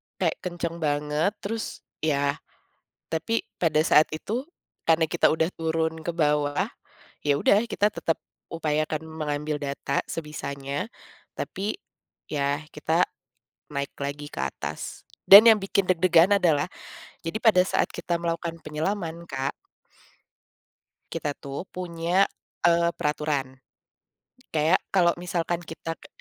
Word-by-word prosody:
kayak -, -, 0 dB
kencang 170 Hz, -1 st, -4 dB
banget, 150 Hz, +5 st, 0 dB
terus, 225 Hz, +2 st, -4 dB, 0.2 s
iya, 140 Hz, -2 st, +1 dB, 0.7 s
tapi 165 Hz, +8 st, -1 dB
pada 160 Hz, -3 st, +2 dB
saat 150 Hz, -, +5 dB
itu, 215 Hz, +11 st, -3 dB, 0.4 s
karena 160 Hz, 0 st, +3 dB
kita 170 Hz, +2 st, +3 dB
sudah 160 Hz, +1 st, +2 dB
turun 160 Hz, 0 st, -1 dB
ke 170 Hz, -, -2 dB
bawah, 150 Hz, +2 st, +1 dB, 0.6 s
ya 145 Hz, -1 st, +2 dB
sudah 200 Hz, +7 st, +4 dB
kita 210 Hz, 0 st, +1 dB
tetap 165 Hz, -, 0 dB, 0.3 s
upayakan 155 Hz, -1 st, -1 dB
mengambil 150 Hz, -1 st, -3 dB
data 140 Hz, 0 st, -1 dB
sebisanya, 145 Hz, +2 st, -4 dB, 0.5 s
tapi 205 Hz, -, -3 dB, 0.5 s
ya 145 Hz, +1 st, -1 dB
kita 160 Hz, +4 st, +2 dB, 0.6 s
naik 140 Hz, -2 st, -3 dB
lagi 145 Hz, +1 st, -4 dB
ke -, -, -5 dB
atas. 75 Hz, +1 st, -5 dB, 0.2 s
Dan 200 Hz, +3 st, +12 dB
yang 215 Hz, -, +1 dB
bikin 195 Hz, 0 st, +1 dB
deg-degan 185 Hz, +1 st, +5 dB
adalah, 155 Hz, -5 st, +3 dB, 0.6 s
jadi 165 Hz, +4 st, -5 dB
pada 215 Hz, -5 st, +6 dB
saat -, -, +1 dB
kita 170 Hz, -, -2 dB
melakukan 170 Hz, 0 st, -2 dB
penyelaman, 170 Hz, +2 st, -3 dB
Kak. 135 Hz, 0 st, -2 dB, 1.6 s
Kita 145 Hz, -, -2 dB
tuh 140 Hz, +4 st, -6 dB
punya, 175 Hz, +1 st, +1 dB, 0.4 s
eee, 170 Hz, 0 st, +4 dB
peraturan. 150 Hz, -3 st, -1 dB, 1.0 s
Kayak 155 Hz, +4 st, +4 dB, 0.2 s
kalau 175 Hz, -2 st, +5 dB
misalkan 175 Hz, -1 st, -1 dB
kita 165 Hz, 0 st, -6 dB
ke -, -, -14 dB
160 Hz, 120 wpm, -26 LUFS, 150-175 Hz, 1.6 s, Dan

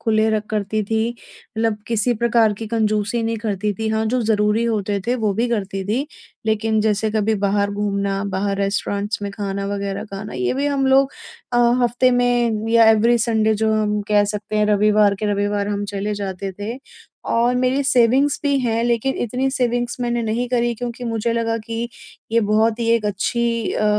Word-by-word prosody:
खुले 220 Hz, -1 st, +2 dB
र 215 Hz, -1 st, +1 dB
करती 215 Hz, 0 st, -1 dB
थी। 220 Hz, +2 st, 0 dB
मतलब 225 Hz, -2 st, -4 dB
किसी 235 Hz, +1 st, +1 dB
प्रकार 230 Hz, -1 st, +3 dB
की 220 Hz, +2 st, -7 dB
कंजूसी 215 Hz, +1 st, 0 dB
नहीं 225 Hz, 0 st, -1 dB
करती 210 Hz, -1 st, -2 dB
थी 220 Hz, +2 st, -3 dB
हाँ, 220 Hz, 0 st, 0 dB
जो 250 Hz, +2 st, 0 dB
ज़रूरी 215 Hz, +1 st, +1 dB
होते 205 Hz, -3 st, -1 dB
थे 245 Hz, -, +1 dB
वो 205 Hz, -, +2 dB
भी 235 Hz, +3 st, 0 dB
करती 195 Hz, -4 st, -2 dB
थी। 245 Hz, +9 st, -1 dB, 0.4 s
लेकिन 220 Hz, 0 st, +1 dB
जैसे 215 Hz, 0 st, +1 dB
कभी 215 Hz, 0 st, +1 dB
बाहर 200 Hz, 0 st, +1 dB
घूमना, 200 Hz, -1 st, -1 dB
बाहर 195 Hz, 0 st, -1 dB
रेस्टोरेंट्स 200 Hz, +1 st, -2 dB
में 200 Hz, -, -3 dB
खाना 200 Hz, -1 st, -3 dB
वग़ैरह 200 Hz, 0 st, -3 dB
खाना 200 Hz, 0 st, -7 dB
ये 125 Hz, -, -1 dB
भी 280 Hz, +2 st, 0 dB
हम 275 Hz, -2 st, +1 dB
लोग 270 Hz, +1 st, +4 dB, 0.4 s
अ, -, -, +1 dB, 0.3 s
हफ़्ते 245 Hz, +2 st, +3 dB
में 240 Hz, -3 st, +1 dB
या 230 Hz, -1 st, +6 dB
एवरी 230 Hz, +2 st, +4 dB
संडे 220 Hz, -1 st, +2 dB
जो 220 Hz, -, +3 dB
हम 210 Hz, -1 st, 0 dB
कह 205 Hz, -1 st, +4 dB
सकते 215 Hz, +1 st, -4 dB
हैं 210 Hz, 0 st, +3 dB
रविवार 210 Hz, 0 st, +3 dB
के 210 Hz, -, +1 dB
रविवार 205 Hz, 0 st, -1 dB
हम 205 Hz, 0 st, -2 dB
चले 205 Hz, +1 st, -2 dB
जाते 195 Hz, -1 st, -4 dB
थे। 225 Hz, +5 st, -5 dB, 0.5 s
और 240 Hz, +2 st, +2 dB
मेरी 255 Hz, +2 st, +1 dB
सेविंग्स 260 Hz, +2 st, +3 dB
भी 280 Hz, -1 st, +2 dB
हैं 230 Hz, -2 st, 0 dB
लेकिन 240 Hz, +2 st, 0 dB
इतनी 255 Hz, +4 st, -1 dB
सेविंग्स 245 Hz, -2 st, -1 dB
मैंने 240 Hz, -1 st, -1 dB
नहीं 230 Hz, +2 st, -1 dB
करी 240 Hz, -1 st, +1 dB
क्योंकि 245 Hz, +1 st, -6 dB
मुझे 230 Hz, 0 st, -1 dB
लगा 230 Hz, -1 st, 0 dB
कि 230 Hz, +1 st, -4 dB, 0.4 s
ये 230 Hz, -, +4 dB
बहुत 220 Hz, +1 st, +2 dB
ही 230 Hz, -, 0 dB
एक 220 Hz, -2 st, 0 dB
अच्छी 230 Hz, +3 st, -1 dB
अ, 215 Hz, -, -1 dB
220 Hz, 190 wpm, -20 LUFS, 205-235 Hz, 0.5 s, या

